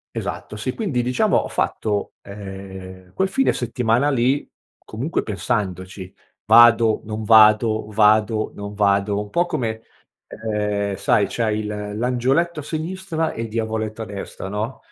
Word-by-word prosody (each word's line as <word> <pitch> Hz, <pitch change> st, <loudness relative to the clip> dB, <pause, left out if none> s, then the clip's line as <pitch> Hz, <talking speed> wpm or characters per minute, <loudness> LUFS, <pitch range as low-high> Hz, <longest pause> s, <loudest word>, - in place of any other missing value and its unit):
Esatto, 105 Hz, -, -5 dB
sì, 125 Hz, +4 st, -3 dB
quindi 160 Hz, -, -1 dB
diciamo, 125 Hz, +1 st, +1 dB
ho -, -, 0 dB
fatto, 105 Hz, -2 st, -2 dB
ehm, 95 Hz, -2 st, -10 dB
quel 190 Hz, 0 st, 0 dB
fine 270 Hz, +7 st, +2 dB
settimana 125 Hz, +3 st, 0 dB
lì 135 Hz, +1 st, +1 dB, 0.3 s
comunque 130 Hz, +10 st, -3 dB
pensandoci: 95 Hz, -3 st, -3 dB, 0.3 s
vado, 115 Hz, 0 st, +6 dB
non 110 Hz, 0 st, -5 dB
vado, 110 Hz, 0 st, +5 dB
vado, 110 Hz, +1 st, +3 dB
non 100 Hz, 0 st, -7 dB
vado, 100 Hz, 0 st, +1 dB
un 105 Hz, -, -6 dB
po' 175 Hz, +10 st, +1 dB
come, 115 Hz, -10 st, -3 dB, 0.4 s
ehm, 105 Hz, -2 st, -2 dB
sai 100 Hz, +1 st, +2 dB
c'hai 110 Hz, -1 st, -1 dB
il 110 Hz, -, -3 dB, 0.3 s
l'angioletto 130 Hz, +7 st, +1 dB
a -, -, -8 dB
sinistra 165 Hz, +1 st, -3 dB
e 115 Hz, -, -5 dB
il 115 Hz, -, -4 dB
diavoletto 110 Hz, 0 st, -3 dB
a 110 Hz, -, -2 dB
destra, 100 Hz, -1 st, -7 dB
no. 105 Hz, +3 st, -4 dB
110 Hz, 140 wpm, -21 LUFS, 100-125 Hz, 0.4 s, vado